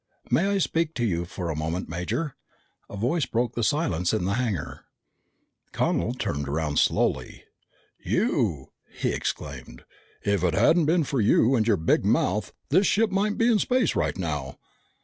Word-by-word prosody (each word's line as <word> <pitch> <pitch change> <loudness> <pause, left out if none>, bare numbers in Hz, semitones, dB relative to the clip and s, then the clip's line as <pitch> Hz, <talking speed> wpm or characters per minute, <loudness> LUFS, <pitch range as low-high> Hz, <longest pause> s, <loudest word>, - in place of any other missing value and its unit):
"May 190 - +3
I 200 0 +1
speak 165 -3 0
to 120 - 0
you 85 -5 -1
a 85 -4 -2
moment, 80 +4 -3
Major?" 110 - -3 0.5
a 100 - -7
voice 135 - 0
broke 120 +1 -1
the 120 - -2
silence 95 - +1
in 90 - 0
the 100 - 0
hangar. 110 -9 -3 0.9
Connel - - 0
turned 70 -1 -3
around 75 0 0
slowly. - - 0 0.6
"You!" 70 -4 0 0.2
he - - -2
exclaimed. - - -5 0.4
"If 100 -3 +1
it 85 -3 +1
hadn't 155 - +4
been 165 +1 +3
for 135 -4 -1
you 110 +4 +4
and 115 -4 +2
your 105 -4 +3
big 80 - +2
mouth, - - +1 0.2
this 185 +7 +4
ship 220 0 +2
might 205 +2 0
be 230 - +3
in 225 -3 +4
space 250 -2 +1
right - - 0
now!" 75 -7 -4
110 Hz, 165 wpm, -25 LUFS, -, 0.9 s, hadn't